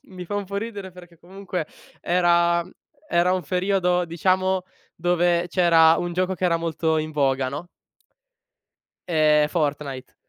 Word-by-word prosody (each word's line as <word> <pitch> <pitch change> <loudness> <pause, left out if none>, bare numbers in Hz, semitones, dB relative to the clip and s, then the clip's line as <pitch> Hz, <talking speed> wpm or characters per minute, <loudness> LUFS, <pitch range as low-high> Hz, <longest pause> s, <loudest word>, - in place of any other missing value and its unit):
mi 180 -1 -8
fa 205 - -6
un 205 - -2
po’ 200 +1 -6
ridere 205 -3 -5
perché 175 -2 -15
comunque 185 -2 -6 0.3
era, 170 -1 +2
mhmm 185 - -16 0.4
era 175 +2 +2
un 185 -2 -2
periodo, 180 +1 +1
diciamo, 185 +2 0 0.3
dove 175 0 +1
c’era 165 -2 +5
un 175 0 -3
gioco 185 +1 -1
che 185 - -4
era 170 -2 +3
molto 160 -1 -1
in 155 0 -4
voga, 135 -3 +1
no. 150 +6 -7 1.4
Ehm, 155 -3 +3
Fortnite. 145 -5 -3
175 Hz, 145 wpm, -23 LUFS, 160-185 Hz, 1.4 s, c’era